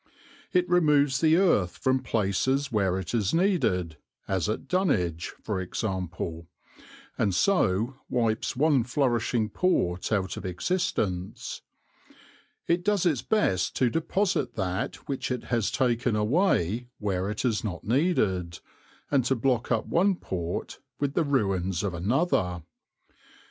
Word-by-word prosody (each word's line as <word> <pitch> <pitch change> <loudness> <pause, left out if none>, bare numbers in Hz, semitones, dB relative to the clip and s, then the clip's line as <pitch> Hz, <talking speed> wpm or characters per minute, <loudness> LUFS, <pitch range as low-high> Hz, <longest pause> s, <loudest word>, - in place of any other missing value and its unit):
It 180 -1 +2
removes 150 -6 +3
the 160 0 +5
earth 165 - +2
from 130 0 +1
places 125 +5 0
where 95 -4 +1
it 95 -3 -5
is 105 +2 +1
needed, 125 - +1 0.3
as 95 -1 0
at 110 - -3
Dunwich 100 - 0
for 100 -4 -2
example, 90 -4 -4 0.7
and 100 -4 +1
so 120 - +2
wipes 115 -3 0
one 145 -2 +3
flourishing 120 -3 0
port 95 - 0
out 95 -3 0
of - - -6
existence: 95 - -2 1.0
it 170 +1 +1
does 205 -2 +1
its 150 -9 +2
best 95 - +1
to 125 -3 +2
deposit 165 - 0
that 95 -2 -2
which 135 -2 -3
it 125 -2 -2
has 115 -4 +2
taken 120 -3 +1
away 115 - +1
where 95 -2 -1
it 105 +4 -3
is 115 -4 0
not 90 -6 -4
needed, 105 - +1 0.5
and 140 -3 +3
to 130 - +2
block 125 0 0
up 115 -2 +1
one 190 +3 +2
port 90 - -4 0.2
with 140 -1 -1
the 170 - +2
ruins 95 - 0
of 100 -3 -1
another. 90 - 0
115 Hz, 135 wpm, -27 LUFS, 95-145 Hz, 1.0 s, the